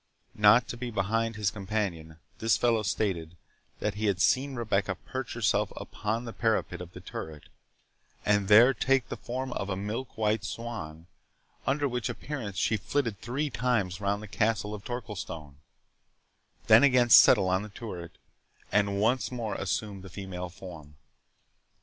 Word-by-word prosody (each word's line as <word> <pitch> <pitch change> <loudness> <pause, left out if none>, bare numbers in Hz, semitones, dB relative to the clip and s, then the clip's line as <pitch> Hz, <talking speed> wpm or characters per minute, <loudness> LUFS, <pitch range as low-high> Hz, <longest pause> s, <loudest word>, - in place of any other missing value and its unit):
Not 105 +3 +5
to 120 - -5
be 120 0 -4
behind 115 +2 0
his 105 -2 0
companion, 95 -6 -3 0.2
this 115 0 +3
fellow 115 -2 +2
stated, 90 -5 -2 0.4
that - - -2
he 105 +1 -2
had 95 -3 +1
seen 135 +8 +2
Rebecca 100 -5 0
perch 130 +6 -6
herself 105 -2 +1
upon 110 +3 -3
the 115 - -6
parapet 110 -5 0
of 90 0 -9
the - - -9
turret, 75 -2 -7 0.8
and 105 -2 +2
there 115 +6 +8
take 135 -1 +1
the - - -3
form 130 +1 -4
of 100 - -4
a 95 - -1
milk 105 +6 -5
white 110 -1 +1
swan, 100 -8 -6 0.6
under 145 +1 +2
which 125 -4 -2
appearance 120 -10 -5
she 110 +4 +2
flitted 115 0 -2
three 140 +5 -2
times 110 -7 0
round 100 +1 -1
the - - -8
castle 105 +1 0
of 105 -1 -7
Torquilstone; 90 - -6 1.1
then 110 +2 +8
again 125 -4 +4
settle 95 - +8
on 95 +1 +2
the 105 - -7
turret, 90 -6 -8 0.5
and 100 -1 +2
once 120 +6 +1
more 115 -4 -3
assume 100 +1 -3
the 95 - -10
female 90 -2 -6
form. 85 -5 -11
105 Hz, 155 wpm, -29 LUFS, 95-120 Hz, 1.1 s, there